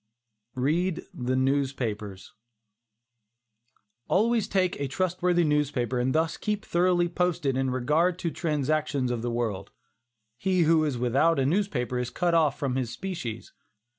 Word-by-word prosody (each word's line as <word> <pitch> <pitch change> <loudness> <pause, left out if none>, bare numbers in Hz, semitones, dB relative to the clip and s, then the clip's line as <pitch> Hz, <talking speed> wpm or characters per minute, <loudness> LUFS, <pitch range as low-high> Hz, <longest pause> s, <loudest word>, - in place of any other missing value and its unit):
READ 160 +7 0
THE 125 0 -2
NEWSPAPERS. 130 -7 -2 1.7
Always 225 +2 +2
take 185 -5 0
a 140 - -1
trustworthy 180 +3 +1
newspaper 145 -5 0
and 125 +2 +1
thus 160 +1 +1
keep 210 -1 -3
thoroughly 175 0 +2
posted 170 -5 0
in 135 0 0
regard 150 +8 +1
to 180 -2 -2
the - - -11
transactions 150 -4 0
of 120 -2 -2
the 120 - -2
world. 110 -5 -2 0.7
He 185 +7 +1
who 160 0 +4
is 140 -5 -1
without 135 +7 +2
a 135 - +2
newspaper 140 -8 0
is 125 -1 -2
cut 170 +6 0
off 155 -4 +3
from 130 -2 -1
his 125 -3 -1
species. 125 - -6
150 Hz, 140 wpm, -27 LUFS, 125-175 Hz, 1.7 s, who